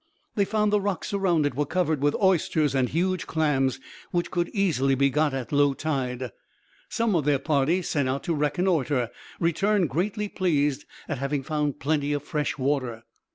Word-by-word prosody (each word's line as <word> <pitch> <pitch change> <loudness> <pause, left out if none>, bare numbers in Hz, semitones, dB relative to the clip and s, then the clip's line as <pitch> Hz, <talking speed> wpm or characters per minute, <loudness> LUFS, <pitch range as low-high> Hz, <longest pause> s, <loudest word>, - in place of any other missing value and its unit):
They 200 -3 +2
found 210 0 +1
the 210 - +3
rocks 200 +1 -2
around 180 -6 +2
it 145 - 0
were 145 +4 0
covered 160 -4 0
with 145 0 +2
oysters 165 -6 +2
and 130 -2 +1
huge 180 +2 0
clams, 145 -5 +1 0.3
which 175 -1 -1
could 175 -1 0
easily 145 - +1
be 140 +1 +2
got 150 +2 +2
at 130 -4 -4
low 145 -1 +3
tide. 130 -5 -2 0.6
Some 230 -4 +1
of 160 - +2
their 145 0 +3
party 155 +5 +1
sent 140 -5 0
out 135 +1 -2
to 170 - -1
reconnoitre 145 -5 +1 0.3
returned 180 +2 +1
greatly 210 +6 -1
pleased 150 -7 0 0.2
at 145 -4 -3
having 140 0 -1
found 150 0 -1
plenty 145 0 0
of 145 -1 -2
fresh 150 -1 -2
water. 130 -4 -1
150 Hz, 175 wpm, -26 LUFS, 140-180 Hz, 0.6 s, the